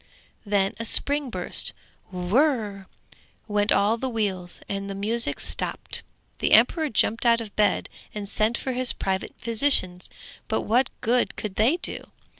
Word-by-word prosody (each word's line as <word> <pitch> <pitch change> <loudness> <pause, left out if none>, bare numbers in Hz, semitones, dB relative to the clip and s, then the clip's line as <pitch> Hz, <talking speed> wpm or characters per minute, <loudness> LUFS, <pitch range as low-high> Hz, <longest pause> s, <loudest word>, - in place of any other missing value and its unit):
Then 200 -1 +1
a - - -3
spring 285 +4 +1
burst, - - -3 0.4
'whirr' 200 - 0 0.6
went 205 -1 +1
all 210 +3 +3
the 260 +2 -3
wheels, 190 -6 -2
and 200 0 -4
the 195 - -5
music 225 +4 0
stopped. - - +1 0.4
The - - +1
emperor 315 -3 +4
jumped 220 +1 +1
out 235 -1 +4
of 220 -3 -8
bed 210 -2 +1 0.2
and 205 -1 -6
sent 215 +3 +1
for 265 - -4
his 255 0 +2
private 190 0 -3
physicians, 225 -7 +2 0.4
but 220 - -1
what 245 +4 +1
good 245 0 +1
could 210 -3 -5
they 235 - +2
do? - - -5
220 Hz, 150 wpm, -24 LUFS, 200-245 Hz, 0.6 s, emperor